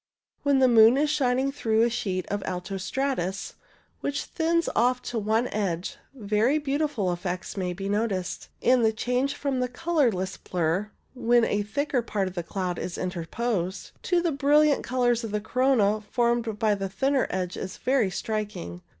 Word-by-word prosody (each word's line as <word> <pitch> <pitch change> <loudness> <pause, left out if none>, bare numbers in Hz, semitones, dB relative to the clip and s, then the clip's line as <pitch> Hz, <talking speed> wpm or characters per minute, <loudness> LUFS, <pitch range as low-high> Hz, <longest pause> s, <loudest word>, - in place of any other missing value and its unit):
When 285 -1 +3
the 260 -1 +5
moon 230 +1 +7
is 295 +1 +2
shining 265 -2 +1
through 225 -5 +1
a 235 - +3
sheet 190 -6 -2
of 205 0 -2
alto 185 +2 -4
stratus, 195 -3 -2 0.5
which 285 0 -2
thins 335 0 0
off 250 +1 +2
to 235 - -3
one 220 +3 +1
edge, 195 +4 -2 0.2
very 220 +4 +1
beautiful 285 - 0
effects 180 +1 -4
may 190 -2 -2
often 180 - -3
be 195 +2 -4
noticed, 205 -3 -2
and 250 -1 +4
the 220 0 +3
change 250 +5 0
from 275 -2 -2
the 250 - +1
colourless 250 - 0
blur, 180 +4 -1 0.2
when 240 -2 +3
a 205 - 0
thicker 255 +5 -1
part 205 -4 -2
of 185 - -6
the 175 - -2
cloud 180 0 -3
is 180 - -4
interposed, 185 +2 -3
to 350 -2 +1
the 340 - +1
brilliant 290 +1 +3
colours 245 -2 +1
of 225 - -4
the 210 0 -1
corona 220 -2 +2
formed 235 -3 +1
by 215 -1 +2
the 195 -1 -3
thinner 270 +7 +1
edges 185 0 -3
is - - -14
very 255 -6 +2
striking. 200 - -4
225 Hz, 175 wpm, -26 LUFS, 195-265 Hz, 0.5 s, moon